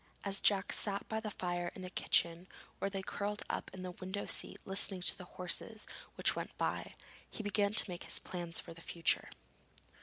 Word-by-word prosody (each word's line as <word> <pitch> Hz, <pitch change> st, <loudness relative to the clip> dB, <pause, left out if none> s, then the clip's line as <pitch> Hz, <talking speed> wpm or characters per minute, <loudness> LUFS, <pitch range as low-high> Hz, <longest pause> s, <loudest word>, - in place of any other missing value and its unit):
As 200 Hz, 0 st, 0 dB
Jack 195 Hz, -2 st, +4 dB
sat 200 Hz, -1 st, +2 dB
by 220 Hz, -, -1 dB
the 220 Hz, -1 st, -4 dB
fire 175 Hz, -3 st, -2 dB
in 185 Hz, -, -7 dB
the 180 Hz, -, -6 dB
kitchen 170 Hz, 0 st, +2 dB, 0.3 s
or 195 Hz, -, 0 dB
lay 195 Hz, -1 st, -4 dB
curled 205 Hz, +2 st, -3 dB
up -, -, -3 dB
in 185 Hz, -, -7 dB
the 180 Hz, -, -4 dB
window 190 Hz, +3 st, -5 dB
seat -, -, 0 dB
listening 195 Hz, -1 st, +2 dB
to -, -, +8 dB
the 180 Hz, -, -10 dB
horses 210 Hz, +4 st, -1 dB, 0.3 s
which -, -, +1 dB
went -, -, -5 dB
by, -, -, -2 dB, 0.3 s
he 220 Hz, -, -7 dB
began 205 Hz, 0 st, +1 dB
to 215 Hz, -, +6 dB
make 180 Hz, -1 st, -6 dB
his -, -, +7 dB
plans 175 Hz, -2 st, -2 dB
for -, -, -8 dB
the 165 Hz, -, -13 dB
future. 165 Hz, 0 st, +1 dB
190 Hz, 195 wpm, -35 LUFS, 180-205 Hz, 0.3 s, to